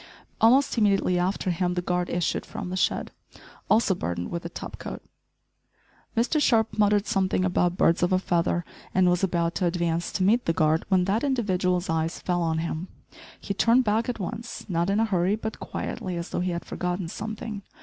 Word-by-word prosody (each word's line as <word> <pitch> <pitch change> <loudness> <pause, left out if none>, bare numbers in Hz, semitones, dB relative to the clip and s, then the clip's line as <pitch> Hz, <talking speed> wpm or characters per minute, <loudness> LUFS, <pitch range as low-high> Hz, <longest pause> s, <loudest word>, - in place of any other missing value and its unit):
Almost 250 +2 +4
immediately 195 -4 +3
after 185 +1 0
him 180 +1 0
the 180 - 0
guard 180 0 -1
issued 175 -1 -1
from 210 -5 -6
the - - -2
shed, 185 - 0 0.6
also 215 -3 +4
burdened 85 - -4
with 170 - -3
a 170 - -5
top - - -8
coat! - - -7 1.1
Mr 260 +7 +2
Sharp 225 -6 +3
muttered 205 -1 +3
something 185 -1 +1
about, 180 -1 +1
"birds 165 - +3
of 175 - +2
a 185 - +4
feather," 175 -2 0 0.3
and 185 -1 +4
was 180 +1 0
about 170 -2 +1
to 180 - +3
advance 170 -1 -1
to 185 - 0
meet 225 +6 +3
the 165 - +2
guard 155 0 +2
when 185 -2 +3
that 200 +4 0
individual's 185 -9 0
eyes 165 +1 -1
fell 175 -1 -1
on 165 -1 0
him. 165 +2 -3 0.5
He 200 - -3
turned 235 +5 +4
back 225 +2 +1
at 240 - -3
once, 225 +5 -5
not 170 -1 0
in 200 +2 +2
a 225 - +3
hurry, 190 -1 +1
but 220 0 -5
quietly 185 -7 -4
as 170 - -5
though - - -2
he 180 +1 0
had 170 -1 -4
forgotten 180 0 -3
something. 215 +2 -5
185 Hz, 195 wpm, -26 LUFS, 175-215 Hz, 1.1 s, Almost